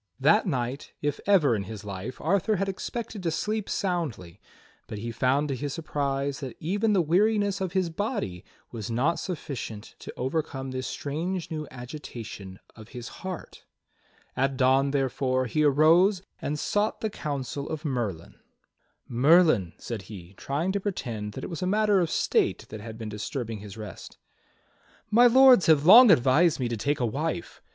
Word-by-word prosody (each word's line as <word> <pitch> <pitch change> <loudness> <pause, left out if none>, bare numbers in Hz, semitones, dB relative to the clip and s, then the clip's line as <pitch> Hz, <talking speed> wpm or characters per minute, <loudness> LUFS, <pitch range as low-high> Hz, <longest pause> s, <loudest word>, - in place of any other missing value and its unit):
That 205 +10 +4
night, 130 -3 -3
if 145 -1 -1
ever 160 - +4
in 100 -2 -3
his 105 0 -8
life, 100 +5 -6
Arthur 200 +6 +1
had 195 +1 -1
expected 215 +2 -5
to 170 - -1
sleep 210 +5 -2
soundly, 145 - -3 0.5
but 105 - -6
he 115 +3 -5
found 130 +6 +1
to 135 - -1
his 140 +2 -4
surprise 140 -3 -2
that 130 -4 -7
even 205 +6 0
the 185 -3 +3
weariness 200 +4 +2
of 185 -2 -2
his 185 -3 0
body 185 - -3 0.3
was 110 -3 -6
not 130 +9 +1
sufficient 130 - -6
to - - -8
overcome 135 -1 -3
this 130 -1 -4
strange 165 +5 -4
new 155 -2 -4
agitation 120 -7 -8 0.2
of 110 0 -13
his 120 -1 -6
heart. 185 -2 -7 0.7
At 135 0 0
dawn, 135 +2 +3
therefore, 130 -1 0
he 150 +6 0
arose 165 +7 +4 0.2
and 150 +1 -2
sought 205 +7 -1
the 220 - -2
counsel 140 -2 -4
of 155 +1 -5
Merlin. 115 - -3 0.7
"Merlin," 135 - +4
said 115 -4 -6
he, 95 -4 -10
trying 145 - -2
to 200 - -1
pretend 115 - -4
that - - -7
it - - -5
was 165 - -5
a 180 - -1
matter 210 0 +3
of 170 -3 +1
state - - +1
that 110 -1 -8
had 110 0 -8
been 110 -2 -6
disturbing 110 +1 -5
his 105 +1 -10
rest. 105 -3 -9 0.9
"My 240 +3 +7
Lords 255 -4 +7
have 155 -2 +5
long 230 +7 +10
advised 150 +2 +4
me 125 - 0
to 120 - -2
take 140 +7 -1
a 125 - +1
wife. 140 - -3
145 Hz, 170 wpm, -27 LUFS, 120-180 Hz, 0.9 s, long